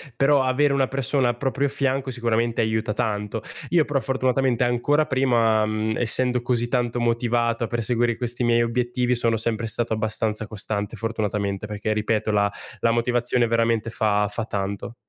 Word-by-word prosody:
Però 140 0 +4
avere 140 +2 +2
una 135 -1 +2
persona 135 -1 +1
al 120 - -2
proprio 140 +2 0
fianco 135 -1 -1
sicuramente 115 -1 0
aiuta 110 -1 0
tanto. 105 -3 -2 0.3
Io 170 -3 +3
però 145 -2 0
fortunatamente 130 -2 +1
ancora 135 +5 +2
prima, 120 -5 +2
mhmm, 110 0 -1
essendo 125 +1 +1
così 120 -1 0
tanto 120 -1 -1
motivato 120 0 0
a - - -1
perseguire 120 0 0
questi 120 0 -2
miei 120 0 +3
obiettivi 125 +1 0
sono 115 -1 +1
sempre 115 0 -2
stato 115 0 -2
abbastanza 110 0 -2
costante 105 0 -3
fortunatamente, 105 -2 -2
perché 105 +1 -2
ripeto 110 0 0
la 100 -1 +2 0.3
la 115 - +2
motivazione 120 +1 +1
veramente 115 0 +1
fa 105 -2 +1
fa 105 +3 -4
tanto. 100 +2 -4
115 Hz, 160 wpm, -23 LUFS, 110-125 Hz, 0.3 s, Però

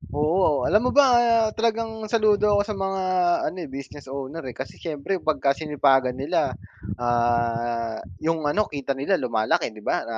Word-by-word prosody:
oo 150 +4 +1 0.2
o - - -2
alam 210 +3 +4
mo - - +3
ba 285 - +8 0.5
talagang 225 0 0 0.2
saludo 215 -2 +3
ako - - +4
sa 215 - -3
mga 195 0 -2 0.5
ano - - -11
eh, - - -11
business 140 +1 -9
owner 140 +4 -6
eh, 120 - -10
kasi 130 - -5
siyempre 160 +4 -3
pag 155 - +1 0.2
sinipagan 135 -4 +2
nila, 145 0 0 0.5
ah, 120 -1 0 0.3
yung 165 0 +1
ano 210 +8 +1
kita 140 -1 -3
nila 140 +8 +1
lumalaki, 120 +7 0
di 105 - -12
ba? - - 0
Na 115 -1 -4
145 Hz, 170 wpm, -24 LUFS, 120-190 Hz, 0.5 s, ba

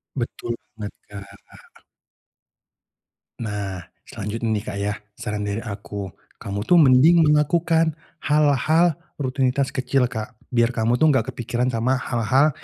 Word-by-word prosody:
Betul 120 -2 -4 0.2
banget, 105 -1 -6 0.2
Kak. 100 -1 -11 2.0
Nah, 100 -5 -4 0.2
selanjutnya 110 +3 -4
nih, 105 -2 0
Kak, 100 -2 -5
ya. 105 +1 -1 0.2
Saran 105 -1 -4
dari 100 +2 -2
aku, 100 -2 -6 0.3
kamu 100 +1 -4
tuh 175 +3 +6
mending 150 +5 +6
melakukan 160 +2 +3 0.2
hal-hal 150 +3 +2 0.2
rutinitas 130 0 0
kecil, 130 -1 0
Kak, 110 -3 -6 0.2
biar 120 0 +2
kamu 115 +1 +1
tuh 155 - +3
gak 130 -1 +1
kepikiran 120 +1 -1
sama 125 +2 0
hal-hal 130 +5 +2
120 Hz, 125 wpm, -22 LUFS, 105-140 Hz, 2.0 s, tuh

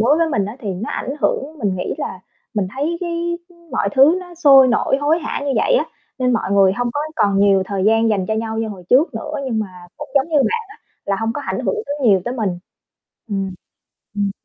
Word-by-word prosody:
đối 280 +7 +4
với 330 -1 +2
mình 205 -9 0
á, 210 +4 -6
thì 215 - -5
nó 210 +5 -5
ảnh - - -3
hưởng. 300 +3 -1
Mình 200 -5 -1
nghĩ 180 - -3
là 185 - -5 0.3
mình 205 -3 0
thấy 310 +5 -1
cái 345 -1 -2 0.4
mọi - - +1
thứ 280 +6 +6
nó 355 -1 -11
sôi 275 -6 +7
nổi, 245 +3 +2
hối 300 +3 +2
hả 315 - -3
như 280 - 0
vậy - - +3
á, - - +3 0.3
nên 250 -1 +2
mọi 230 -4 -1
người 195 -1 +5
hông 245 +3 -1
có 290 - -1 0.2
còn 200 -6 +2
nhiều 195 -1 +4
thời 195 -1 -2
gian 225 +1 +4
dành 195 -4 0
cho 220 - 0
nhau 220 0 -2
như 225 - -1
hồi 195 -4 -8
trước 275 +2 +4
nữa, 300 +7 -5
nhưng 230 -4 -1
mà 215 - -1 0.3
cũng 295 - -8
giống 275 +3 +3
như 315 - +1
bạn 455 - +1
á, 420 - -13 0.3
là 200 - +1
hông 225 0 -1
có 290 - -4
ảnh - - -3
hưởng - - +1
tới 285 - -3
nhiều 195 -3 +5
tới 245 - -2
mình. 220 -6 -1 0.8
Ừm. 195 -2 -2 0.7
Ừm 200 -1 0
240 Hz, 240 wpm, -19 LUFS, 205-295 Hz, 0.8 s, sôi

